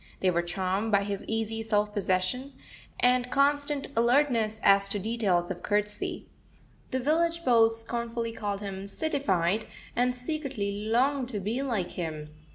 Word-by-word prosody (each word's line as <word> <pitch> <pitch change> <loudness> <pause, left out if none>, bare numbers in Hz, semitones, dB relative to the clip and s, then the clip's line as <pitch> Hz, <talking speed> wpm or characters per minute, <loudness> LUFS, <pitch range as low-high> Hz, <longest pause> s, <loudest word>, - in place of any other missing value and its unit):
They 185 - +3
were 170 0 +1
charmed 190 +5 -1
by 200 -1 +4
his 200 -1 -3
easy 225 0 -1
self 210 -1 0
possession, 205 +7 0 0.5
and 250 0 +3
constant 285 +1 +1
alertness 235 -2 +2
as 195 0 +5
to 205 - +1
details 195 -5 0
of 180 - -5
courtesy. 210 0 -2 0.6
The 260 - -1
village 335 +5 +1
beaus 225 -2 +4
scornfully 230 0 -3
called 205 -3 -3
him 195 -1 -5
"cityfied," 205 - 0 0.3
and 250 +1 +2
secretly 250 -7 -3
longed 255 +3 +2
to 215 -5 -1
be 215 +7 -2
like 225 -10 -1
him. 155 -3 -5
225 Hz, 145 wpm, -28 LUFS, 200-250 Hz, 0.6 s, as